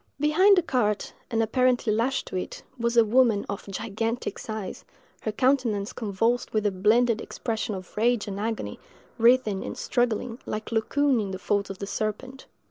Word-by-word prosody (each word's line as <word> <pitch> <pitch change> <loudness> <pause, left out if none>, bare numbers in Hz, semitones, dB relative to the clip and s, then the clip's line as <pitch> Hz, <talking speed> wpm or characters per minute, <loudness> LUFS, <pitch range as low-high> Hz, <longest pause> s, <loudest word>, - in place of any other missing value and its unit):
Behind 365 +7 +5
the 360 - +4
cart, 215 -9 0 0.2
and 225 -2 +1
apparently 245 -1 +2
lashed 240 +5 0
to - - -6
it, 185 - -4 0.2
was 235 0 0
a 230 - +7
woman 225 -2 +3
of 200 0 -5
gigantic 225 +4 -3
size, 215 -3 -6 0.4
her 215 - -2
countenance 235 -4 +1
convulsed 225 +3 -1
with 215 -1 +1
a 205 - +3
blended 220 +4 +3
expression 220 -2 -3
of 185 -1 -10
rage 235 0 +2
and 200 0 -4
agony, 225 +1 -3 0.4
writhing 230 -4 +4
and - - -6
struggling, 240 0 -1
like 215 +1 -4
Laocoon 260 +4 +2
in 200 - -3
the 190 - -4
folds 200 +1 -1
of 195 - -6
the 200 - -5
serpent. 215 +6 -4
225 Hz, 170 wpm, -26 LUFS, 210-245 Hz, 0.4 s, a